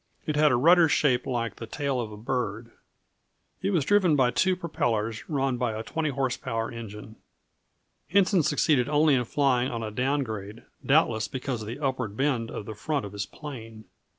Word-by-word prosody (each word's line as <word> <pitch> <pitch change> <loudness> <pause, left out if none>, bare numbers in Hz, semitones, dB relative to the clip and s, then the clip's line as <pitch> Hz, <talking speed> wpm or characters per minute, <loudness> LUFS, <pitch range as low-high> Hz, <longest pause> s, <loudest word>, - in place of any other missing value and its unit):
It 155 - -1
had 150 -1 +4
a - - +4
rudder 165 +6 +5
shaped 130 -5 +2
like 115 -4 -2
the 115 - -7
tail 140 0 -2
of 110 -2 -6
a 105 - -9
bird. 115 -1 -3 0.9
It 190 - 0
was 170 -8 +1
driven 190 -5 +4
by 130 -3 +3
two 185 +6 +2
propellers 115 -11 -2
run 135 -4 0
by 120 -2 -1
a 110 - -4
20 155 +5 -2
horse 135 -2 -1
power 115 0 -3
engine. 110 -1 -9 0.9
Henson 195 0 +4
succeeded 145 -3 +2
only 150 0 +4
in 125 -2 +2
flying 130 -1 +1
on 115 -1 -4
a 110 - -4
down 135 +6 0
grade, 110 -1 -7 0.2
doubtless 120 -7 +3
because 130 -2 -4
of 105 - -7
the 115 +4 -5
upward 130 -7 -2
bend 130 -5 0
of 105 - -6
the 110 - -6
front 140 +4 -2
of 100 - -9
his 100 -1 -4
plane. 115 -7 -9
125 Hz, 190 wpm, -27 LUFS, 115-150 Hz, 0.9 s, rudder